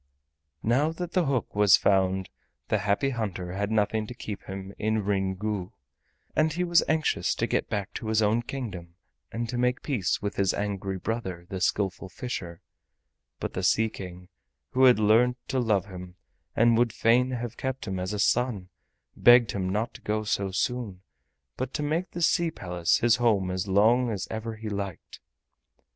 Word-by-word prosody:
Now 135 Hz, +8 st, +2 dB
that 175 Hz, +1 st, -5 dB
the 180 Hz, -4 st, +1 dB
hook 130 Hz, -6 st, -1 dB
was 105 Hz, -2 st, +6 dB
found 95 Hz, -1 st, +1 dB, 0.4 s
the -, -, +2 dB
Happy 105 Hz, +7 st, +1 dB
Hunter 95 Hz, -7 st, -4 dB
had 100 Hz, +2 st, -2 dB
nothing 110 Hz, 0 st, +1 dB
to 125 Hz, -, -8 dB
keep 105 Hz, -4 st, -6 dB
him 95 Hz, 0 st, -7 dB
in 110 Hz, 0 st, 0 dB
Ryn 95 Hz, -2 st, 0 dB
Gu, 100 Hz, -2 st, -3 dB, 0.6 s
and 155 Hz, 0 st, +3 dB
he 175 Hz, +3 st, -1 dB
was 175 Hz, -1 st, +4 dB
anxious 155 Hz, -1 st, +1 dB
to -, -, 0 dB
get -, -, -1 dB
back 100 Hz, -2 st, -3 dB
to 110 Hz, -, -6 dB
his 110 Hz, 0 st, +2 dB
own 110 Hz, +2 st, +2 dB
kingdom 100 Hz, -10 st, -6 dB, 0.4 s
and 115 Hz, +2 st, -3 dB
to 120 Hz, +1 st, -3 dB
make 125 Hz, +1 st, +1 dB
peace 120 Hz, -, 0 dB
with 100 Hz, 0 st, -4 dB
his 95 Hz, -1 st, +2 dB
angry 100 Hz, -2 st, -3 dB
brother, 95 Hz, -4 st, -4 dB
the 95 Hz, -1 st, -5 dB
Skillful 95 Hz, -1 st, 0 dB
Fisher; 90 Hz, -5 st, -6 dB, 0.8 s
but -, -, -4 dB
the -, -, -2 dB
Sea 110 Hz, 0 st, +3 dB
King, 90 Hz, -2 st, -9 dB, 0.4 s
who 130 Hz, +1 st, +4 dB
had 125 Hz, -3 st, +7 dB
learnt 115 Hz, +4 st, +4 dB
to 130 Hz, -, 0 dB
love 105 Hz, -6 st, +1 dB
him 90 Hz, -2 st, -10 dB, 0.4 s
and 115 Hz, 0 st, +4 dB
would 120 Hz, -1 st, +3 dB
fain 125 Hz, +3 st, +3 dB
have 120 Hz, -2 st, -4 dB
kept 130 Hz, 0 st, -4 dB
him 95 Hz, -1 st, -3 dB
as 90 Hz, 0 st, -3 dB
a 105 Hz, -, -2 dB
son, 105 Hz, -2 st, +1 dB, 0.5 s
begged 120 Hz, -2 st, +6 dB
him 95 Hz, -2 st, -2 dB
not 105 Hz, +5 st, -1 dB
to -, -, -12 dB
go 110 Hz, 0 st, -1 dB
so 100 Hz, -2 st, -1 dB
soon, 100 Hz, -1 st, -2 dB, 0.5 s
but 130 Hz, 0 st, -4 dB
to 150 Hz, -, -1 dB
make 165 Hz, +5 st, -1 dB
the 175 Hz, -, -4 dB
Sea 170 Hz, +1 st, +3 dB
Palace 90 Hz, -, 0 dB
his 120 Hz, 0 st, +3 dB
home 105 Hz, -6 st, +2 dB
as 95 Hz, +2 st, -2 dB
long 115 Hz, +6 st, +4 dB
as 100 Hz, -4 st, -3 dB
ever 110 Hz, 0 st, -4 dB
he 110 Hz, 0 st, -7 dB
liked. 100 Hz, -4 st, -5 dB
110 Hz, 185 wpm, -27 LUFS, 95-125 Hz, 0.8 s, had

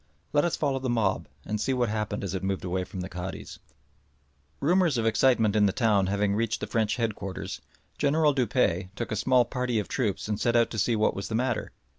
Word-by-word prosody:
Let 145 Hz, +2 st, +4 dB
us 175 Hz, -, 0 dB
follow 140 Hz, -3 st, 0 dB
the 130 Hz, -1 st, -3 dB
mob 110 Hz, -5 st, 0 dB, 0.2 s
and 105 Hz, 0 st, -2 dB
see 130 Hz, +2 st, 0 dB
what 125 Hz, -1 st, +1 dB
happened 105 Hz, -1 st, -2 dB
as 95 Hz, -2 st, -3 dB
it 95 Hz, -, -2 dB
moved 95 Hz, -1 st, -2 dB
away 90 Hz, +1 st, -1 dB
from 95 Hz, -1 st, -6 dB
the 90 Hz, -, -4 dB
Cadi's. 90 Hz, 0 st, -7 dB, 1.0 s
Rumours 170 Hz, -2 st, +3 dB
of 115 Hz, -, 0 dB
excitement 115 Hz, -2 st, +3 dB
in 105 Hz, -1 st, +5 dB
the -, -, +1 dB
town 105 Hz, -3 st, +2 dB
having 100 Hz, +1 st, +1 dB
reached 115 Hz, +1 st, 0 dB
the -, -, -3 dB
French 110 Hz, -2 st, 0 dB
headquarters, 110 Hz, -5 st, -4 dB, 0.4 s
General 150 Hz, +1 st, +3 dB
Dupuy 115 Hz, -8 st, +1 dB
took 120 Hz, -, -4 dB
a -, -, 0 dB
small 125 Hz, +4 st, +3 dB
party 125 Hz, -1 st, -2 dB
of 105 Hz, -, -1 dB
troops 110 Hz, -7 st, -1 dB
and 105 Hz, -1 st, -2 dB
set 120 Hz, 0 st, +2 dB
out 115 Hz, -1 st, +3 dB
to 110 Hz, -, -3 dB
see 115 Hz, +3 st, +2 dB
what 110 Hz, 0 st, +2 dB
was 100 Hz, -, -5 dB
the 110 Hz, -, -3 dB
matter. 120 Hz, 0 st, -1 dB
110 Hz, 220 wpm, -27 LUFS, 100-125 Hz, 1.0 s, in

